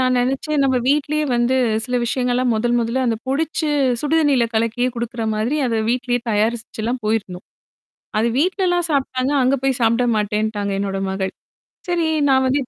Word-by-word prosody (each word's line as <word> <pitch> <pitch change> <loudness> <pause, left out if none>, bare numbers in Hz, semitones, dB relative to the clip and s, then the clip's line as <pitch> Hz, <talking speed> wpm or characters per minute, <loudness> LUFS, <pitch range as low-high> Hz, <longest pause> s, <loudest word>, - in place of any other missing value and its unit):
நான் 255 -1 +2
நினைச்சேன். 270 +4 0
நம்ம 260 -1 +2
வீட்டிலேயே 300 +2 +1
வந்து 240 +2 +2 0.3
சில 250 +1 -1
விஷயங்கள் 245 +1 0
எல்லாம், 250 -1 +1
முதல், 240 +2 0
முதல்ல 235 +3 -1
அந்தப் 225 -1 -2
பொடிச்சு 310 +3 -1 0.3
சுடுதண்ணீல 290 -5 +2
கலக்கியே 230 +3 +1
குடுக்குறமாதிரி, 230 +1 -2
அத 230 -2 0
வீட்டிலேயே 245 0 0
தயாரிச்சு 225 +2 -1
எல்லாம் 240 +2 -2
போயிருந்தோம். 210 -5 -2 0.7
அத 220 - +2
வீட்டுலலாம் 355 0 +1
சாப்பிட்டாங்க. 265 -1 0
அங்க 260 +2 +3
போய் 270 -2 +1
சாப்பிட 230 +2 +3
மாட்டேன்னுட்டாங்க, 210 -1 -1
என்னோட 195 -1 -2
மகள். 190 0 -3 0.5
சரி 345 -2 +1 0.2
நான் 265 -1 +4
வந்து 270 +3 +2
245 Hz, 150 wpm, -20 LUFS, 225-275 Hz, 0.7 s, நான்